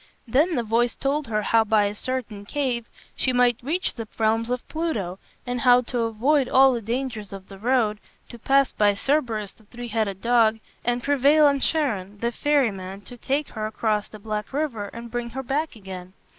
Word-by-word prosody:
Then 300 +9 +2
the 240 - 0
voice 230 +2 +1
told 280 +1 -1
her 215 -1 -1
how 225 +2 +4
by 215 -1 +3
a 200 - -1
certain 225 -3 -4
cave 245 0 -2 0.3
she 260 - +1
might 245 -1 +3
reach 325 +9 -1
the 225 -3 -6
realms 225 +1 +1
of 250 0 -3
Pluto, 220 - -3 0.3
and 245 -1 -2
how 250 0 +6
to 245 0 -3
avoid 245 +5 +2
all 265 0 +6
the 235 - -2
dangers 230 -2 -3
of 195 -1 -9
the 195 -1 -11
road, 225 -2 +1 0.3
to 235 - -10
pass 275 +3 +3
by 205 -1 +3
Cerberus, 225 -5 0
the 220 - -24
three 240 +2 -8
headed 215 -4 -1
dog, 230 -1 +3 0.2
and 240 0 0
prevail 285 +2 +4
on 280 -1 +4
Charon, 215 - 0
the 235 +3 -1
ferryman, 205 -10 0
to 225 +5 -11
take 275 +4 -2
her 215 -1 -4
across 215 -1 -1
the 215 - -11
black 210 0 -4
river 270 -7 -2
and 235 +2 -9
bring 240 0 -3
her 265 +3 -5
back 290 +4 -2
again. 190 -3 -9
235 Hz, 195 wpm, -24 LUFS, 215-265 Hz, 0.3 s, how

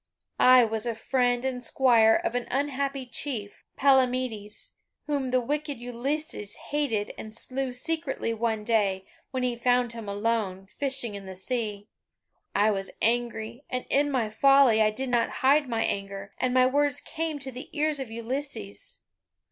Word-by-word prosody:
"I 255 -1 +8
was 220 +1 -1
a 230 - -1
friend 245 +1 +1
and 250 -2 -2
squire 230 -3 +5
of - - -1
an 245 0 -2
unhappy 275 0 -1
chief, 240 -5 -5
Palamedes, 255 -6 +1 0.3
whom 280 -3 -1
the 255 0 +3
wicked 290 +3 -2
Ulysses 245 -2 -3
hated 275 -9 -2
and 215 0 -6
slew 260 +2 -3
secretly 275 -2 -1
one 225 -1 -1
day, 200 -4 +1 0.2
when 260 -1 -2
he 250 -1 0
found 245 0 +2
him 225 -3 -7
alone, 205 -2 -1
fishing 260 +1 -2
in 200 -1 -8
the 190 - -7
sea. 210 0 -3 0.7
I 210 +1 +4
was 195 -1 -2
angry, 235 +1 -1
and 250 0 -3
in 290 +1 +3
my 240 -6 0
folly 275 -1 +5
I 215 - +5
did 255 +5 -4
not 240 -2 +2 0.2
hide 285 0 +4
my 230 -1 0
anger, 195 0 -4
and 255 - +1
my 255 0 +5
words 285 +1 +2
came 320 -1 -4
to 270 -1 -7
the 255 +4 -9
ears 305 -1 0
of 265 -4 -5
Ulysses. 235 - -5
245 Hz, 160 wpm, -27 LUFS, 220-270 Hz, 0.7 s, I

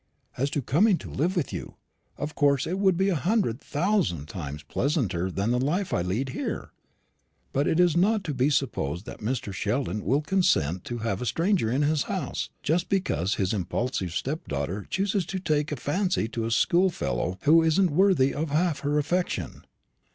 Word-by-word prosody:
As 135 +3 0
to 140 -1 -2
coming 180 - +3
to - - -9
live 170 +8 0
with 170 -6 -1
you, - - -6 0.4
of 150 +1 -4
course 140 -2 +2
it 185 +4 -2
would 190 -3 +3
be 195 +2 +2
a 185 - +1
hundred 170 - +1
thousand 150 - 0
times 75 -4 -6
pleasanter 105 - -1
than 100 +5 -1
the 125 - +2
life 170 +9 0
I - - +2
lead 105 +10 -1
here; - - -4 0.8
but 140 +2 +1
it 160 - +2
is 175 -2 +4
not 205 +4 +3
to 155 - -3
be 130 +2 +2
supposed 110 - -1
that - - -8
Mr. 110 -2 -3
Sheldon 105 0 -1
will 135 +8 +2
consent 95 - +1
to 120 - -4
have 100 -2 -1
a 125 - -2
stranger 170 - +1
in 135 +5 +1
his 150 0 +2
house - - -3
just 165 +3 0
because 110 - 0
his 95 0 0
impulsive 95 -1 -2
stepdaughter 95 - -3
chooses 195 0 0
to 190 - -3
take 150 -4 0
a - - 0
fancy 180 - 0
to 115 -1 -3
a - - -1
schoolfellow 115 - +1
who 165 +3 +6
isn't 165 +2 +3
worthy 170 -5 +4
of 155 +2 -2
half 155 +1 +1
her 145 +1 0
affection." 175 +5 -2
145 Hz, 185 wpm, -26 LUFS, 110-175 Hz, 0.8 s, who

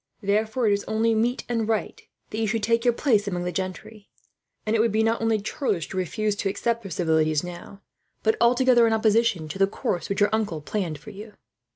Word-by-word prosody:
Therefore 215 +4 +1
it 205 - +4
is 200 - -1
only 225 +1 +1
meet 235 +3 0
and 230 -3 -1
right 220 -2 -2 0.3
that 215 - -3
you 225 - 0
should 220 +1 -1
take 230 +1 +2
your 245 - +4
place 215 -8 +2
among 180 -3 -2
the 180 - -2
gentry; 190 +3 -6 0.6
and 215 +1 +1
it - - +2
would 225 0 +3
be 220 +1 +2
not 225 +1 +1
only 225 -1 +2
churlish 200 - -2
to - - -7
refuse 205 +3 -1
to 195 - -1
accept 230 +4 -1
their 195 - -8
civilities 160 -3 +1
now, 180 +3 -9 0.4
but 220 0 +3
altogether 240 0 +5
in 225 - +2
opposition 220 -6 +2
to 175 +6 -7
the 195 - +5
course 180 -4 -3
which 200 - -1
your 205 +1 +3
uncle 210 -7 -1
planned 165 0 -3
for 165 +9 -11
you." 210 +1 -10
215 Hz, 220 wpm, -25 LUFS, 190-225 Hz, 0.6 s, altogether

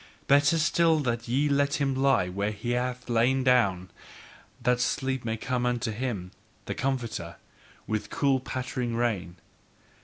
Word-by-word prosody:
Better 145 +3 +4
still 165 +1 +3
that 120 -3 -2
ye 135 +5 +1
let 140 0 +2
him 140 -2 0
lie 130 -8 +2
where 100 +3 -2
he 105 +3 -4
hath 125 +1 -2
lain 125 +3 +2
down, 100 -9 +2 0.7
that 125 0 +1
sleep 130 +1 -1
may 115 -1 -2
come 125 +1 -2
unto 125 -1 0
him, 105 -6 -4 0.3
the - - -3
comforter, 120 -10 -3 0.5
with 110 -1 -3
cooling 135 -2 +1
patter 130 0 -4
rain. 115 -7 -1
125 Hz, 145 wpm, -27 LUFS, 110-135 Hz, 0.7 s, Better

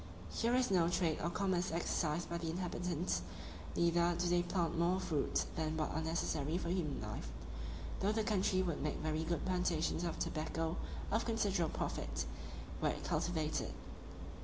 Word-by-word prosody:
Here 235 +2 +2
is 250 -4 +3
no 170 -3 +5
trade 175 -3 +2
or 170 - +1
commerce 185 -1 +1
exercised 165 0 0
by 170 0 -2
the 165 -1 -2
inhabitants; 175 0 -1 0.5
neither 170 0 +4
do 175 0 +1
they 175 0 +4
plant 175 -1 0
more 175 +3 +3
fruits 155 -6 +1
than 160 0 0
what 155 - 0
are 160 - -1
necessary 160 -1 0
for 170 - -2
human 170 -6 0
life, 105 - -4 0.7
though 200 - +3
the 220 0 +1
country 190 -3 +3
would 170 -4 -1
make 150 0 0
very 155 0 0
good 170 0 -1
plantations 180 -3 +1
of 170 - -1
tobacco 160 +1 -1 0.4
of 220 +2 +3
considerable 200 -7 +1
profit, - - -1 0.6
were - - +3
it - - -3
cultivated. 155 -3 0
170 Hz, 160 wpm, -37 LUFS, 160-185 Hz, 0.7 s, no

